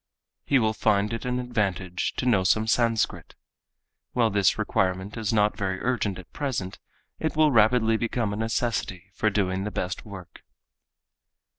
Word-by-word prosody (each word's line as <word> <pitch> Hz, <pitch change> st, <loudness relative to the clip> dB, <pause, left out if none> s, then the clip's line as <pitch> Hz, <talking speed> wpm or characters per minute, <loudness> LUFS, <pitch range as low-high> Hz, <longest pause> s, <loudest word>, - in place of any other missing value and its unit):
He 140 Hz, -, +3 dB
will 110 Hz, -3 st, +2 dB
find 105 Hz, 0 st, +1 dB
it 115 Hz, -, -4 dB
an 125 Hz, 0 st, -1 dB
advantage 100 Hz, -7 st, -2 dB
to -, -, -2 dB
know 105 Hz, -7 st, +3 dB
some 110 Hz, +4 st, +2 dB
Sanskrit. 115 Hz, -1 st, 0 dB, 0.8 s
While 115 Hz, -3 st, +2 dB
this 100 Hz, -2 st, +3 dB
requirement 95 Hz, +2 st, -1 dB
is 110 Hz, -3 st, -2 dB
not 105 Hz, -2 st, +2 dB
very 95 Hz, -2 st, -2 dB
urgent 110 Hz, -6 st, -1 dB
at 90 Hz, -, -13 dB
present, 115 Hz, -10 st, -3 dB, 0.4 s
it 160 Hz, -, -2 dB
will 155 Hz, -1 st, +4 dB
rapidly 110 Hz, -1 st, +4 dB
become 115 Hz, -2 st, -1 dB
a -, -, -3 dB
necessity 110 Hz, -5 st, -2 dB
for 110 Hz, -, +1 dB
doing 95 Hz, -2 st, 0 dB
the 105 Hz, -, -2 dB
best 90 Hz, -3 st, -4 dB
work. 95 Hz, -5 st, -11 dB
110 Hz, 155 wpm, -26 LUFS, 95-115 Hz, 0.8 s, will